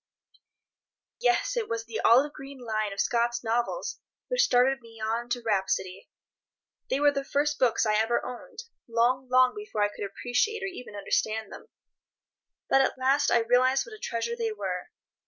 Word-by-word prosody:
Yes, - - +1
it 470 -3 -2
was 230 0 -3
the 230 -1 -5
olive 270 +6 +4
green 275 -2 -10
line 215 -4 -2
of 195 - -7
Scott's 240 0 +1
novels 240 - -1 0.3
which - - +2
started 250 - +3
me 225 -1 -15
on 225 +2 -2
to 245 -1 -2
rhapsody. 190 -3 -1 0.8
They 265 - +1
were 290 0 +5
the 275 -1 -2
first 290 +1 0
books 235 -3 +3
I 215 - +2
ever 225 +2 +1
owned—long, 255 - -2
long 255 0 +5
before 415 - -3
I 205 - +2
could - - -5
appreciate 250 - -1
or 390 -1 -3
even 250 - -9
understand 215 +2 -1
them. - - -11 1.0
But 270 - +4
at 265 - 0
last 270 +3 +2
I 235 - +4
realized 255 +3 +3
what - - -11
a 430 - -11
treasure 235 - -3
they 460 -1 -2
were. 430 - -4
250 Hz, 170 wpm, -27 LUFS, 230-285 Hz, 1.0 s, were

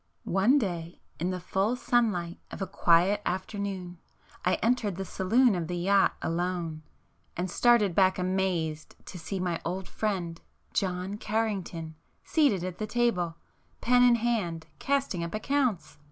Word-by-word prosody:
One 200 +10 +4
day 175 - -3 0.2
in 175 +3 0
the 185 -1 -2
full 195 +6 0
sunlight 210 -9 0
of - - -8
a 195 - -1
quiet 180 +4 +3
afternoon, 185 -1 -4 0.4
I 180 - +3
entered 225 -5 0
the 195 +2 -4
saloon 225 +7 +3
of 175 -3 -2
the 175 0 -3
yacht 195 +3 +3
alone, 170 -2 -2 0.6
and 180 +1 -2
started 235 -5 +4
back 185 +1 +4
amazed 180 -4 -1
to 180 - -8
see 190 +4 -4
my 175 -2 -1
old 185 +2 -3
friend 180 -6 -3 0.3
John 185 +1 -1
Carrington 200 -7 -2 0.3
seated 275 - +2
at 180 -1 -5
the 215 - -2
table, 210 -7 0 0.4
pen 245 +1 +4
in 245 -1 +6
hand, 215 -9 -1
casting 275 -11 0
up 170 +4 -4
accounts. 250 - -1
190 Hz, 145 wpm, -28 LUFS, 175-215 Hz, 0.6 s, in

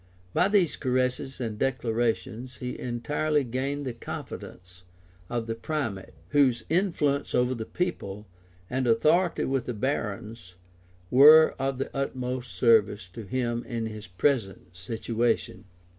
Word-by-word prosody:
By 180 - +4
these 195 -6 +2
caresses 130 +1 -1
and 110 -4 -4
declarations 120 -1 -1
he 125 0 -5
entirely 150 +5 0
gained 135 +4 -3
the 125 - -3
confidence 90 -5 -8 0.5
of 120 -2 -2
the 115 - -2
primate, 115 -6 -4
whose 130 -6 +3
influence 165 -6 +1
over 125 +1 +2
the 110 -3 -5
people, 105 - -3 0.4
and 130 +2 -1
authority 155 +10 +3
with 135 -2 -1
the 125 - -4
barons, 110 -5 -3 0.6
were 155 +5 +8
of 135 0 -1
the 135 - -4
utmost 125 -3 -3
service 105 -2 +3
to 110 +3 -9
him 120 +1 -1
in 115 -2 -3
his 110 -2 -7
present 95 -3 -1
situation. 115 +4 -2
125 Hz, 130 wpm, -27 LUFS, 110-135 Hz, 0.6 s, were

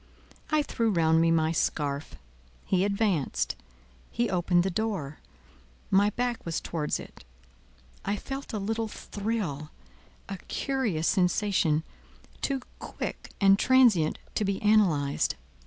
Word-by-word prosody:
I 305 -1 +3
threw 230 -5 0
round 165 -4 +3
me 165 - +4
my 160 -1 +3
scarf. 145 - -1 0.5
He 185 -1 +2
advanced; 185 - 0 0.5
he 235 +1 -1
opened 175 -1 +2
the 190 - -1
door; 175 -8 -2 0.7
my 200 +2 +5
back 245 +2 -2
was 165 -1 -2
towards 155 -3 -2
it; - - -12 0.8
I 200 - 0
felt 270 +6 -6
a 220 - -2
little 220 +2 -2
thrill—a 190 - -6
curious 230 - -1
sensation, 180 -4 +2 0.6
too 270 -2 -1 0.2
quick - - -6
and 195 0 +5
transient 235 -12 +4 0.2
to 215 - 0
be 195 -1 -1
analyzed. 170 - +3
195 Hz, 120 wpm, -28 LUFS, 160-220 Hz, 0.8 s, my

